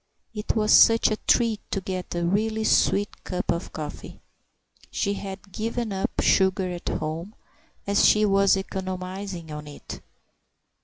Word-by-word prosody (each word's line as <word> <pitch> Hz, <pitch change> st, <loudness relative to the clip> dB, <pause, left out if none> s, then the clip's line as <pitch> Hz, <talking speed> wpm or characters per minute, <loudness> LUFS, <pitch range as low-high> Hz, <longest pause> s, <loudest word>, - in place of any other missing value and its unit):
it 210 Hz, +1 st, -2 dB
was 215 Hz, -1 st, +3 dB
such 225 Hz, -1 st, +6 dB
a 215 Hz, -, 0 dB
treat 230 Hz, -3 st, +3 dB
to 195 Hz, -, -1 dB
get 185 Hz, -2 st, -5 dB
a 170 Hz, 0 st, -1 dB
really 215 Hz, +4 st, 0 dB
sweet 205 Hz, -1 st, +1 dB
cup 180 Hz, -1 st, -2 dB
of 170 Hz, +2 st, -3 dB
coffee; 150 Hz, -1 st, -7 dB, 0.7 s
she 200 Hz, -, -1 dB
had 195 Hz, 0 st, -8 dB
given 225 Hz, +2 st, -3 dB
up 190 Hz, -, -1 dB
sugar 190 Hz, -1 st, +2 dB
at 175 Hz, -1 st, -5 dB
home 160 Hz, +7 st, -4 dB, 0.5 s
as 200 Hz, 0 st, +2 dB
she 215 Hz, 0 st, +5 dB
was 195 Hz, -1 st, +4 dB
economising 185 Hz, -2 st, -5 dB
on 150 Hz, 0 st, -7 dB
it. 145 Hz, -, -9 dB
195 Hz, 145 wpm, -25 LUFS, 180-210 Hz, 0.7 s, such